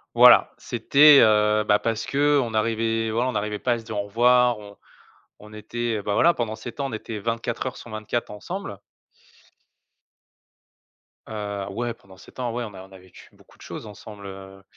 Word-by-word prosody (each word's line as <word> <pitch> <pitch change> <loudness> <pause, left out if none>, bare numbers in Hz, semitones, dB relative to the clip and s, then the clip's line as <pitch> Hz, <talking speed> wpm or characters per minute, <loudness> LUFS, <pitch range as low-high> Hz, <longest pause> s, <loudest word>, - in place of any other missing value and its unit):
Voilà. - - +7
C'était, 140 +5 +5
heu, 105 0 +4
ben, 105 0 +3
parce 115 -1 -2
que, 145 0 +2
on 120 - -2
n'arrivait 115 0 0
voilà, 120 +3 0
on - - -2
n'arrivait 105 0 -3
pas 125 - 0
à 120 - 0
se 115 - -12
dire - - -6
au - - 0
revoir. 120 +2 +3
On 100 -1 -13 0.7
on 105 - -14
était, 115 +1 -3
ben, 100 - -2
voilà 170 +9 +4
pendant 110 -2 -3
ces 115 +2 -8
temps, 140 - -5
on 125 - -8
était 110 0 -6
24 115 +2 -3
heures - - -4
sur - - -11
24 110 +2 -4
ensemble. 105 - -7 2.5
Heu, 100 -2 -5
ouais, 120 -1 -3
pendant 95 -4 -19
7 95 - -17
ans, 120 -2 -2
ouais 120 0 -3
on 105 -3 -9
a 95 - -9
on 95 0 -16
a 95 - -12
vécu 90 -1 -17
beaucoup - - -22
de - - -16
choses - - -8
ensemble, 105 0 -11
heu 95 0 -11
110 Hz, 195 wpm, -24 LUFS, 105-120 Hz, 2.5 s, Voilà